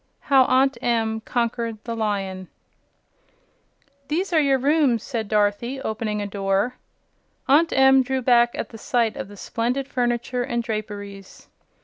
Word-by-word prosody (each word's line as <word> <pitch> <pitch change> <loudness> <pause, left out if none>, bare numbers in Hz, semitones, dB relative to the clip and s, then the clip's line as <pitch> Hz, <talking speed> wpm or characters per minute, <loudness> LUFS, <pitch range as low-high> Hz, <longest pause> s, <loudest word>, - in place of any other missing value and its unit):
7. - - -23
How 265 -2 +6
Aunt 260 -1 +2
Em 225 -2 0
Conquered 235 -1 -2
the 230 -1 -4
Lion 195 -4 -3 1.6
"These 345 +6 -2
are 320 - +5
your 275 -2 +3
rooms," 270 -4 +2
said 230 -5 -4
Dorothy, 210 +5 0
opening 215 -3 -3
a - - -3
door. 200 +4 -1 0.7
Aunt 310 +5 +4
Em 265 0 +5
drew 260 0 -2
back 240 -1 +4
at - - -4
the 225 - -11
sight 230 -1 0
of 180 - -6
the 205 0 -13
splendid 245 +7 -2
furniture 245 -1 -1
and 240 -2 -2
draperies. 205 -3 -7
235 Hz, 145 wpm, -23 LUFS, 215-265 Hz, 1.6 s, How